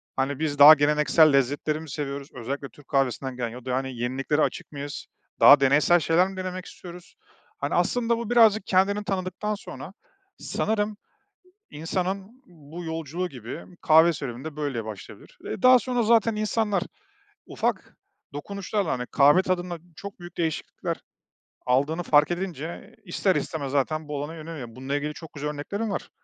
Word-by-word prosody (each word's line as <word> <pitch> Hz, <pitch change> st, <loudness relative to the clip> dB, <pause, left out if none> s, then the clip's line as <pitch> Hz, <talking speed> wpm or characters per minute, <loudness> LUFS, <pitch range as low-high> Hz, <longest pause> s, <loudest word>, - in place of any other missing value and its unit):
Hani, 135 Hz, +1 st, -1 dB
biz 145 Hz, -2 st, -2 dB
daha 150 Hz, +2 st, +12 dB
geleneksel 150 Hz, +1 st, +4 dB
lezzetleri 145 Hz, +3 st, +1 dB
mi 160 Hz, -2 st, -10 dB
seviyoruz 140 Hz, -1 st, -5 dB
özellikle 135 Hz, +2 st, -5 dB
Türk 145 Hz, +4 st, -19 dB
kahvesinden 135 Hz, -1 st, -1 dB
gelen 120 Hz, -2 st, -2 dB
ya 125 Hz, +2 st, -11 dB
da 130 Hz, +1 st, -1 dB
yeniliklere 130 Hz, +4 st, -1 dB
açık -, -, -2 dB
mıyız? 145 Hz, 0 st, -6 dB, 0.3 s
Daha 145 Hz, -, +9 dB
deneysel 145 Hz, +6 st, +4 dB
şeyler 165 Hz, +4 st, +3 dB
mi 195 Hz, -1 st, -9 dB
denemek 185 Hz, 0 st, -5 dB
istiyoruz? 175 Hz, 0 st, -12 dB, 0.4 s
Hani, -, -, -2 dB
aslında, 235 Hz, -1 st, +1 dB
bu 235 Hz, -1 st, -5 dB
birazcık 220 Hz, -4 st, +5 dB
kendini 200 Hz, +2 st, +2 dB
tanıdıktan 195 Hz, +2 st, -3 dB
sonra, -, -, -10 dB, 0.4 s
sanırım, 210 Hz, -1 st, -2 dB, 0.7 s
insanın 190 Hz, -, -4 dB
bu 165 Hz, 0 st, -11 dB
yolculuğu 165 Hz, +2 st, -4 dB
gibi 125 Hz, +5 st, -8 dB, 0.2 s
kahve 160 Hz, +2 st, +6 dB
serüveni 130 Hz, -4 st, -6 dB
de 160 Hz, -2 st, -6 dB
böyle 135 Hz, -7 st, -3 dB
başlayabilir. 105 Hz, -3 st, -10 dB
Eee, -, -, -5 dB
daha 255 Hz, 0 st, +7 dB
sonra 245 Hz, -2 st, -1 dB
zaten 225 Hz, -1 st, +3 dB
insanlar 215 Hz, -2 st, 0 dB, 0.6 s
ufak -, -, -3 dB, 0.4 s
dokunuşlarla, 200 Hz, +4 st, -3 dB
hani, 125 Hz, -1 st, -2 dB
kahve 145 Hz, +6 st, +5 dB
tadında 180 Hz, -2 st, -2 dB, 0.2 s
çok 200 Hz, +1 st, -9 dB
büyük 175 Hz, 0 st, -11 dB
değişiklikler 160 Hz, -2 st, -3 dB, 0.7 s
aldığını 140 Hz, +7 st, +1 dB
fark 150 Hz, 0 st, +4 dB
edince 175 Hz, -3 st, -5 dB
ister 185 Hz, +1 st, 0 dB
istemez 140 Hz, -4 st, -3 dB
zaten 150 Hz, +2 st, -1 dB
bu 145 Hz, -1 st, -3 dB
alana 160 Hz, +2 st, -7 dB
yöneliyor, 155 Hz, -6 st, -7 dB
bununla 135 Hz, +2 st, -3 dB
ilgili 150 Hz, +1 st, -3 dB
çok 160 Hz, 0 st, -11 dB
güzel 150 Hz, 0 st, -4 dB
örneklerim 200 Hz, +9 st, -4 dB
var. -, -, -4 dB
160 Hz, 155 wpm, -25 LUFS, 140-190 Hz, 0.7 s, daha